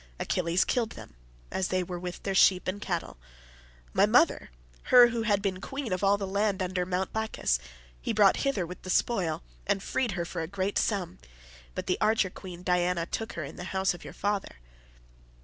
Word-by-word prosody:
Achilles 175 +1 +1
killed 235 -4 0
them - - -11 0.4
as 190 -1 0
they 185 0 0
were 175 0 -5
with 180 0 -6
their 195 - -1
sheep 190 -1 +5
and 195 +2 -2
cattle. 175 - -3 0.8
My - - +5
mother—her - - +4
who 235 -1 -2
had 205 -3 +1
been 190 -2 -1
queen 270 -5 -4
of 185 - -2
all 200 +1 +4
the 200 - -3
land 200 0 0
under 180 -1 -1
Mt. 185 +1 -1
Placus—he - - -3
brought 210 -3 +5
hither 275 -11 0
with 180 +2 -9
the 185 - -9
spoil, 185 - +1 0.2
and 195 - +1
freed 240 -6 -1
her 175 -1 -2
for 175 0 -4
a 160 - -3
great 195 +2 -1
sum, 195 - -1 0.6
but - - -3
the 180 - -1
archer 215 -3 +3
queen 180 -2 -9
Diana 180 -1 +1
took 225 +5 -4
her 170 - -4
in 140 - -8
the 175 - -6
house 190 0 +2
of 175 - -11
your - - -9
father. 205 -1 -2
185 Hz, 190 wpm, -28 LUFS, 175-205 Hz, 0.8 s, sheep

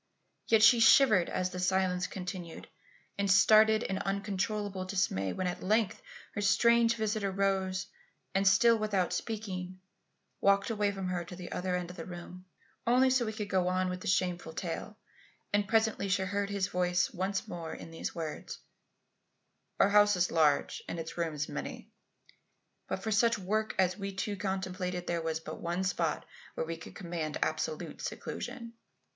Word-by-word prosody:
Yet 225 -1 +5
she 235 +1 +8
shivered 225 -6 +6
as 185 0 -1
the 180 - -5
silence 180 0 +1
continued, 180 -3 -7 0.5
and 200 0 +1
started 215 +2 +6
in 190 - -2
uncontrollable 200 0 -2
dismay 185 - -1
when 185 - -3
at 180 0 -3
length 215 - +1 0.3
her 205 - -3
strange 235 +3 +4
visitor 215 -2 -1
rose, 190 -1 0 0.5
and 195 +1 +2
still, 230 +3 +5
without 200 -4 0
speaking, 185 -4 -4 0.6
walked 200 +2 +3
away 210 -2 +1
from 195 -2 -4
her 180 -1 -2
to 180 - -9
the 175 -1 -9
other 180 0 -1
end 180 -1 -3
of 180 - -13
the - - -6
room. 180 +1 -9 0.4
Only 255 +2 +5
so 255 -2 +2
could 215 - -4
he 215 -2 -3
go 190 -3 +1
on 185 0 +1
with 180 0 -5
the - - -6
shameful 180 -3 0
tale; 180 +5 -5 0.6
and 205 0 +2
presently 220 -1 +1
she 190 0 +2
heard 200 +1 -2
his 200 -2 0
voice 180 -1 +1
once 195 +3 -2
more 170 -5 -6
in 165 - -9
these 165 - -5
words: 160 -3 -5 1.2
"Our 195 - +5
house 205 0 +5
is 180 0 +1
large 150 -3 +2
and - - -4
its 165 0 -6
rooms 160 -3 -2
many; - - -6 1.0
but - - -4
for 220 - -2
such 230 +2 +3
work 215 +3 -1
as 185 +1 +2
we 200 0 -3
two 205 +2 -2
contemplated 185 -2 -3
there 170 -1 -1
was 160 -1 -2
but 160 - -8
one 175 +2 -1
spot 175 -4 -1 0.3
where - - -2
we 165 +1 -4
could 165 - -11
command 170 -4 -4
absolute 155 0 -3
seclusion. 245 -2 -6
190 Hz, 170 wpm, -31 LUFS, 180-210 Hz, 1.2 s, she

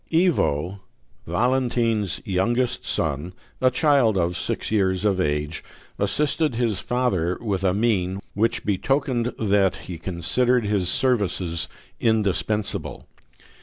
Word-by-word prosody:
Ivo, 100 - +1 0.5
Valentine's 115 0 +1
youngest 120 +7 0
son, 80 +3 -1 0.3
a 130 - +5
child 130 -5 +3
of 90 0 0
six - - -3
years 95 -2 +1
of 100 -3 +2
age, 75 0 -1 0.4
assisted 145 +7 +1
his 115 -5 0
father 100 -7 0
with 100 -5 -2
a 95 - +3
mien 95 -3 0
which 115 +3 0
betokened 125 +3 0
that 100 -3 +2
he 85 -3 -8
considered 105 +8 +1
his 100 -4 +1
services 95 -8 0 0.3
indispensable. 100 -4 0
100 Hz, 110 wpm, -23 LUFS, 90-120 Hz, 0.5 s, a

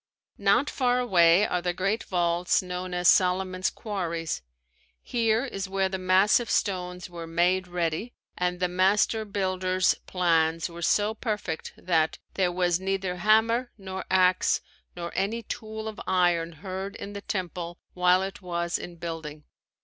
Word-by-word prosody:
Not 200 +8 +3
far 250 -3 +1
away 185 -5 +5
are 180 - -1
the 175 0 -1
great 195 +5 0
vaults 175 0 +1
known 180 0 -5
as 180 0 +1
Solomon's 185 0 +3
Quarries. 170 -6 -3 0.6
Here 230 0 +1
is 195 -7 -5
where 195 0 +1
the 190 0 -3
massive 190 +6 +3
stones 180 -3 -1
were 170 -2 -8
"made 180 +3 +1
ready" 175 +6 -2 0.2
and 180 0 -1
the 180 - +2
master 195 +4 +2
builder's 185 -2 +1
plans 165 -2 +2
were 170 0 -9
so 205 +5 +2
perfect 210 -7 -4
that, 160 -3 +1 0.2
"there 185 -2 +1
was 175 -1 +1
neither 190 -1 -2
hammer 220 +5 +3
nor 190 -2 -6
ax 185 -1 +3 0.3
nor 170 -1 -5
any 220 +5 -1
tool 220 0 -6
of 220 0 -6
iron 175 -2 +2
heard 190 +4 -6
in 205 - -7
the 200 - -6
temple 180 -4 -4 0.2
while 180 +1 +3
it 195 +1 -6
was 170 -1 -2
in 175 - -8
building." 160 -3 -6
185 Hz, 150 wpm, -27 LUFS, 175-200 Hz, 0.6 s, away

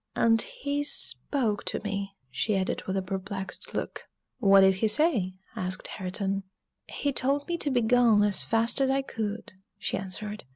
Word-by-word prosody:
"And 225 -1 +4
he 285 +1 -3
spoke 260 -6 +2
to - - -2
me," 200 -1 -4 0.2
she 210 - 0
added 190 0 -2
with 190 0 -1
a 190 - -1
perplexed 190 +1 -5
look. - - -4 0.3
"What 195 -1 +6
did 190 -1 +5
he 220 - +2
say?" 215 - +2 0.2
asked 185 -3 -4
Hareton. 195 +1 -3 0.5
"He 285 -1 -2
told 280 +3 0
me 345 - -1
to 290 - -1
begone 240 -3 +4
as 205 -2 +3
fast 230 +4 +2
as 265 - +3
I 270 0 +1
could," 220 -6 -5 0.2
she - - -2
answered. 205 +2 -3
210 Hz, 165 wpm, -27 LUFS, 195-250 Hz, 0.5 s, What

